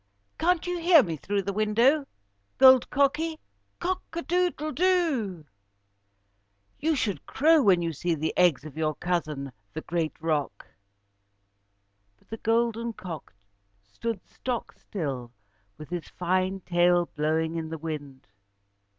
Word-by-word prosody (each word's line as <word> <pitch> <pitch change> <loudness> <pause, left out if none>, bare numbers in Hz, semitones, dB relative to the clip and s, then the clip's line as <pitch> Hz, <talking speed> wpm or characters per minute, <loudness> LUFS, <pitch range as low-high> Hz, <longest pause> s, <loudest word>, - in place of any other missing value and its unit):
"Can't 355 +1 +2
you 355 -1 -2
hear 335 -4 +6
me 165 -5 -3
through 200 +6 -2
the 200 +1 -3
window, 230 +8 +3 0.5
Gold 260 -2 +7
Cocky? 295 +4 +1 0.4
Cock 370 +1 -1
a 340 +1 -3
doodle 350 -3 0
do! 300 - +1 1.3
You 315 +1 +1
should 200 - -2
crow 315 +2 +4
when 185 -7 +4
you 165 -1 -2
see 170 +3 -1
the 155 +1 -2
eggs 170 -6 +3
of 155 - -9
your 155 -1 -1
cousin, 155 -6 -2 0.2
the 160 - -4
great 165 -2 -2
roc." 150 -10 -2 1.5
But - - -32
the 225 - -5
golden 230 +1 0
cock 170 - -8 0.5
stood 200 - -5
stock 250 -2 -4
still, 135 - -5 0.5
with 155 +2 -11
his 175 -4 -4
fine 185 +2 -1
tail 175 0 +3
blowing 160 +2 0
in 160 -1 -3
the 160 - -5
wind. 145 -4 -6
185 Hz, 135 wpm, -27 LUFS, -, 1.5 s, Gold